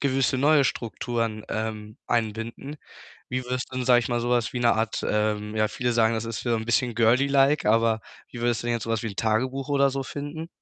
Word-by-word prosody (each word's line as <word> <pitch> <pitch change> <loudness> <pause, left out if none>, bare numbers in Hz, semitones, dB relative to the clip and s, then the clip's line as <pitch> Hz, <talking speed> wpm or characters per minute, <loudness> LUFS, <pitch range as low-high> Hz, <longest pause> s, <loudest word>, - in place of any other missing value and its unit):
gewisse 135 -1 +1
neue 145 +1 +5
Strukturen, 115 -2 -2
ähm, 110 -1 -4
einbinden. 115 +5 -2 0.5
Wie 130 0 -3
würdest 125 +1 -3
du - - -5
denn, 125 - -1
sage 125 -1 +6
ich 120 - -1
mal, 120 -1 0
so 120 - -2
was 120 +1 +1
wie 125 - -3
'ne 120 -1 +4
Art, 110 0 -1
ähm 105 0 -1
ja, 110 0 +3
viele 120 +3 -1
sagen, 115 -1 +3
das 110 0 -2
ist 115 0 -5
wieder 120 -2 +1
'n 110 - -4
bisschen 120 +1 +1
girly 120 +4 +4
like, 140 +1 +3
aber 115 0 +3 0.3
wie 120 - -8
würdest 120 -1 0
du 120 - -4
denn 120 - +1
jetzt 115 - -3
so 115 - -5
was 115 +1 0
wie 115 - -2
'n 100 - -9
Tagebuch 130 +5 0
oder 140 -1 +3
so 135 0 -3
finden? 145 +4 -6
120 Hz, 235 wpm, -25 LUFS, 110-130 Hz, 0.5 s, sage